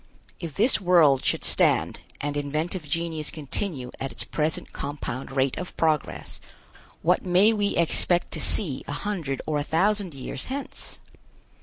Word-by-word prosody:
If 165 -5 -6
this 225 +1 +3
world 165 -8 +5
should - - +1
stand - - +2 0.2
and 145 0 -2
inventive 155 +3 -2
genius 165 -2 -2
continue 145 -3 -4
at 135 - -3
its - - -5
present 155 +1 -1
compound 140 -2 -4
rate 135 -1 +1
of 180 - -7
progress, 155 -3 0 0.6
what - - +3
may 190 +5 +5
we 205 -2 0
expect 175 +1 +2
to - - -3
see 150 -11 +2
a 145 - -3
hundred 155 -6 -3
or 150 -1 0
a - - -1
thousand 190 +1 +1
years 135 0 -6
hence? 275 +2 -6
160 Hz, 150 wpm, -26 LUFS, 145-185 Hz, 0.6 s, world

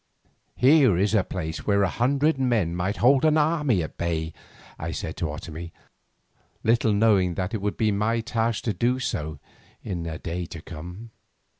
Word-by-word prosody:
"Here 130 - +5
is 100 +3 +1
a 105 -4 +4
place 80 -4 -5
where 100 -1 +3
a - - +3
hundred 140 - +1
men 110 -10 +1
might 95 +4 -1
hold 135 +3 +4
an 155 0 +4
army 150 - +2
at 80 - -8
bay," 80 -1 -2 0.5
I - - -4
said - - -4
to 80 - -2
Otomie, 80 +3 -7 0.9
little 115 0 +3
knowing 100 -4 +3
that 90 +4 -3
it 110 - -2
would 105 0 -2
be 110 -1 +2
my 110 +3 0
task 115 -1 -1
to 110 - 0
do 120 +7 +1
so 75 - -3 0.5
in 85 -3 -4
a 80 -1 -4
day 85 +1 -4
to 80 - -9
come. 90 +8 -9
105 Hz, 175 wpm, -25 LUFS, 85-120 Hz, 0.9 s, Here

